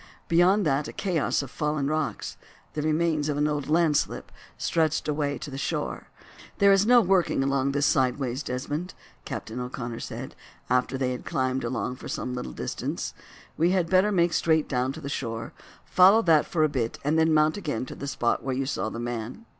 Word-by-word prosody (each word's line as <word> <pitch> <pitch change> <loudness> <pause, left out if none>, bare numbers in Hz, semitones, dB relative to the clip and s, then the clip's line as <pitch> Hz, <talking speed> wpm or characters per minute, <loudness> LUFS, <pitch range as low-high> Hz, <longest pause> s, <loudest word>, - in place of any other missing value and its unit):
Beyond 180 +4 +4
that 140 0 +1
a - - -8
chaos 170 -7 0
of 135 - -9
fallen 150 -2 -1
rocks—the 155 0 -4
remains 155 -1 +1
of 145 - -1
an 150 +1 +2
old 150 -2 -2
landslip—stretched 160 0 0
away 145 -1 -1
to 145 - -7
the 135 - -5
shore. - - -3 0.5
"There 200 0 +6
is 195 +2 +4
no 245 0 +7
working 185 -8 +2
along 135 0 +1
this 145 0 +2
side 130 -3 +2
ways, 130 -1 -3
Desmond," 145 +7 -4 0.3
Captain 115 +3 -5
O'Connor 125 -2 -5
said, - - -7 0.4
after 125 +1 +2
they 130 -1 0
had 125 - -5
climbed 130 0 -1
along 125 +1 -2
for - - -9
some 125 - -3
little 125 - -4
distance. - - -4 0.4
"We 165 +2 +3
had 180 -3 0
better 190 +3 +4
make 170 -3 +2
straight 160 -2 +2
down 130 -1 0
to 160 - -9
the 140 - -6
shore, 115 -5 -4 0.3
follow 195 +5 +6
that 160 -4 +4
for 160 -3 +1
a - - +5
bit, 125 -6 -2
and 150 +3 +2
then 160 0 +4
mount 155 0 +4
again 145 - -3
to - - -8
the 140 - -6
spot 120 -4 0
where 130 -1 -1
you 135 +1 -1
saw 130 -5 -2
the 115 - -7
man." 120 - -5
145 Hz, 195 wpm, -26 LUFS, 130-165 Hz, 0.5 s, no